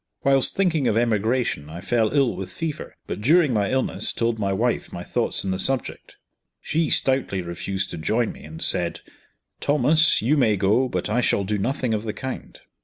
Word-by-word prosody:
Whilst 135 -1 +4
thinking 165 -8 +1
of 110 - +1
emigration 115 - 0
I 85 +2 -7
fell 110 +4 0
ill 135 -5 +2
with 95 -1 -6
fever; 160 - -5
but - - -5
during 150 +3 +4
my 100 -3 +1
illness 130 0 0
told 115 -1 -1
my 100 -2 0
wife 115 +5 -1
my - - -6
thoughts - - 0
on 95 - -1
the 95 - -2
subject. 130 +4 -3 0.4
She 160 -1 -1
stoutly 130 -8 +1
refused 95 +3 -4
to - - -6
join 110 +8 0
me, - - -13
and 80 +1 -6
said, 85 -1 +1 0.6
"Thomas, 150 +3 +3
you 135 +8 +2
may 110 -6 +3
go; 105 +7 +2
but 90 -5 -2
I 110 +4 +1
shall 100 - +1
do 105 +1 -2
nothing 125 +2 -1
of 105 - -1
the 110 -1 -4
kind." 130 +5 -7
115 Hz, 190 wpm, -23 LUFS, 100-135 Hz, 0.6 s, Whilst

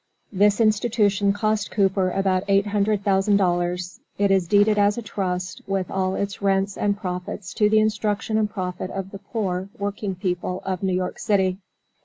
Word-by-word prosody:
This 205 +2 +3
institution 210 -2 +2
cost 215 +1 0
Cooper 195 -2 +1
about 190 0 +1
eight 195 0 +3
hundred 205 0 0
thousand 195 +1 +3
dollars. 175 -1 -1 0.2
It 200 -1 +2
is 190 -3 +2
deeded 205 +2 +4
as 205 +1 +3
a 235 - -4
trust, 185 -3 -3
with 195 -2 -2
all 190 0 0
its 200 0 -3
rents 195 0 +1
and 205 -1 0
profits, 180 -1 -5
to 210 -1 +3
the 220 - +4
instruction 215 0 0
and 210 -1 +1
profit 185 -3 -4
of 195 0 -5
the 195 - -8
poor 195 -3 -3
working 200 -1 -3
people 180 0 -3
of 185 -2 -2
New 190 -2 0
York 180 0 -3
city. 190 -4 +1
195 Hz, 175 wpm, -23 LUFS, 185-205 Hz, 0.2 s, deeded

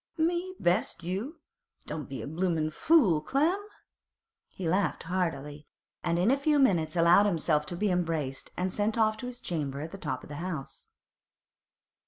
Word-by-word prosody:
'Me 345 +3 0
best 180 0 0
you? 220 - -4 0.4
Don't 150 -2 -5
be 135 - -5
a - - -6
bloomin' 160 -1 0
fool, 210 - +4
Clem!' 320 - +1 0.8
He 185 - -6
laughed 180 0 +1
heartily, 155 -5 -3 0.4
and 170 -1 +1
in 185 +7 +3
a 275 - +3
few 295 +1 +2
minutes 180 - +3
allowed 175 +4 +6
himself 155 -4 +1
to 175 - -4
be 205 +2 0
embraced 160 -6 -2
and 185 0 -1
sent 215 +2 0
off 215 -1 +3
to 250 - -6
his 250 -1 -6
chamber 145 -5 -3
at 155 +3 -6
the 195 - -8
top 130 - -3
of - - -12
the 145 - -6
house. 165 -5 -6
180 Hz, 170 wpm, -29 LUFS, 155-220 Hz, 0.8 s, allowed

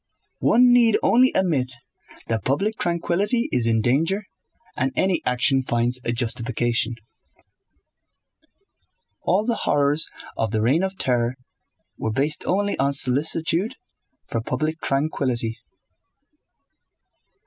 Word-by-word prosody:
One 245 +2 +5
need 235 -3 +5
only 255 +2 +4
admit 145 -9 +1 0.5
that 110 -4 -2
public 200 +11 -1
tranquillity 180 +7 0
is 120 -2 +1
in 115 -1 +2
danger 165 - +1 0.5
and 130 +1 -1
any 190 -1 +1
action 130 +2 +2
finds 120 0 -1
a 120 - -1
justification. 120 0 -1 2.3
All 205 +3 +1
the 235 - +1 0.2
horrors 145 +1 +3 0.3
of 110 - -1
the 110 0 -1
reign 135 +9 +2
of 190 0 -3
terror 120 -1 0 0.6
were 110 - -2
based 145 +7 +1
only 200 +2 +1
on 140 +1 +2
solicitude 160 - +1 0.5
for 115 - -3
public 155 +7 -3
tranquillity. 130 -5 -1
140 Hz, 110 wpm, -23 LUFS, 120-185 Hz, 2.3 s, One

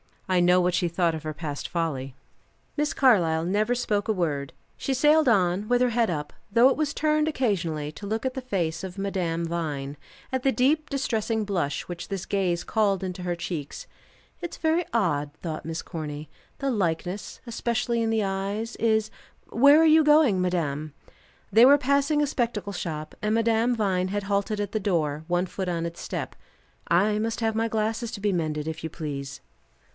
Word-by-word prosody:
I 185 -1 +2
know 180 +1 +5
what 180 0 +1
she 175 - +1
thought 170 0 +1
of 160 -1 -5
her 155 0 -4
past 150 -2 -5
folly. 140 -6 -3 0.6
Miss 295 0 0
Carlyle 175 -12 +3
never 210 +7 +1
spoke 210 -4 -1
a 220 - +2
word. 145 -7 -2 0.2
She 270 - -1
sailed 300 +3 +4
on, 195 -2 +2
with 245 +1 +2
her 250 - +4
head 230 -1 +1
up, 150 -3 -3 0.2
though 235 +4 +6
it - - 0
was 300 -2 0
turned 305 0 +1
occasionally 170 - -1
to 200 +6 -9
look 220 +4 -2
at 260 - 0
the 265 - -4
face 175 -10 -2
of 190 0 -7
Madame 180 -4 -1
Vine, 150 -4 -3 0.3
at 260 -1 -1
the 270 - +3
deep 295 +5 +2
distressing 225 -5 -1
blush 175 -9 -1
which 175 -1 -7
this 195 -2 -4
gaze 180 -3 0
called 200 -3 +1
into 180 -1 -5
her 175 -1 -1
cheeks. 170 -4 -5 0.5
"It's 345 -2 -6
very 325 +2 +1
odd," 150 -10 0
thought 160 -3 -4
Miss 165 0 -3
Corny. 150 -2 -6 0.3
"The 275 -1 0
likeness, 185 -2 -2
especially 235 0 -1
in 225 - 0
the 220 -1 +1
eyes, 200 +4 -3
is 220 -1 +1 0.4
Where 280 +6 +6
are - - +5
you 315 0 +7
going, 295 -10 +5
madame?" 155 -5 -1 0.6
They 225 +4 +7
were 280 +2 +8
passing 280 +2 +2
a - - +1
spectacle 230 -7 -2
shop, 155 -4 -5
and 215 +1 +1
Madame 230 +1 +2
Vine 190 -4 0
had 205 +1 -2
halted 200 +1 -1
at 205 -1 -3
the 215 - -1
door, 160 -6 -1
one 175 +1 +1
foot 190 +1 -5
on 170 -1 -1
its 170 0 -6
step. - - -5 0.5
"I 205 +5 +3
must 225 +2 -2
have 225 -1 +1
my 225 +1 0
glasses 225 +1 -1
to 200 - -7
be 205 0 +1
mended, 155 -4 -2
if 160 0 -4
you 160 - -3
please." 140 -3 -6
195 Hz, 190 wpm, -26 LUFS, 165-230 Hz, 0.6 s, were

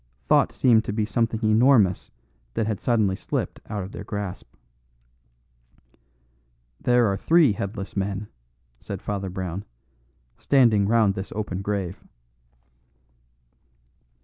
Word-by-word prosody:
Thought - - +3
seemed 115 -4 +3
to - - -3
be 110 0 0
something 115 0 -1
enormous 110 -4 +4 0.5
that 110 - 0
had 110 -2 -2
suddenly 110 -6 +2
slipped - - -4
out 105 -2 -3
of 95 - -8
their - - -7
grasp. 100 -4 -6 2.3
"There 120 -1 +3
are 100 -2 +1
three 155 - +4
headless 100 0 -5
men," 100 +1 -2 0.5
said - - -6
Father 100 -2 -4
Brown, 95 0 -5 0.8
"standing 115 -8 +3
round 110 -3 +3
this 95 +1 -6
open 100 -3 -3
grave." 100 -3 -3
105 Hz, 115 wpm, -24 LUFS, 95-115 Hz, 2.3 s, enormous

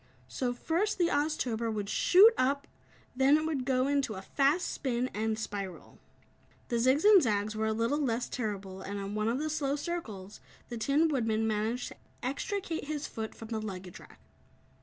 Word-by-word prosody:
So 250 -2 -2
first, 335 - -1
the 345 -2 +2
Oztober 255 -7 0
would 205 -2 -3
shoot 400 - +6
up, 280 +2 +1 0.5
then 270 +3 +5
it 310 - -2
would 290 -5 -2
go 260 -1 +2
into 280 -5 0
a 190 - -7
fast 285 - +2
spin, 250 -1 -1
and 220 +1 -1
spiral. 200 -4 -6 0.7
The 235 - +1
zigs 260 +5 +3
and 415 -3 +8
zags 215 -3 0
were 220 0 0
a - - +1
little 230 +7 0
less 240 -3 0
terrible, 195 -5 -4
and 200 0 -5
on 200 +1 -5
one 215 +1 -1
of 235 +2 +1
the 305 +3 -2
slow 290 -2 -1
circles, 225 - -5 0.3
the 240 - -5
Tin 285 +7 +3
Woodman 225 -7 0
managed 220 +3 -1
to - - -13 0.3
extricate 330 - -3
his 295 0 -3
foot 220 -1 -6
from 225 - -10
the 220 -2 -2
luggage 190 -3 -7
rack. - - -16
245 Hz, 180 wpm, -30 LUFS, 215-290 Hz, 0.7 s, and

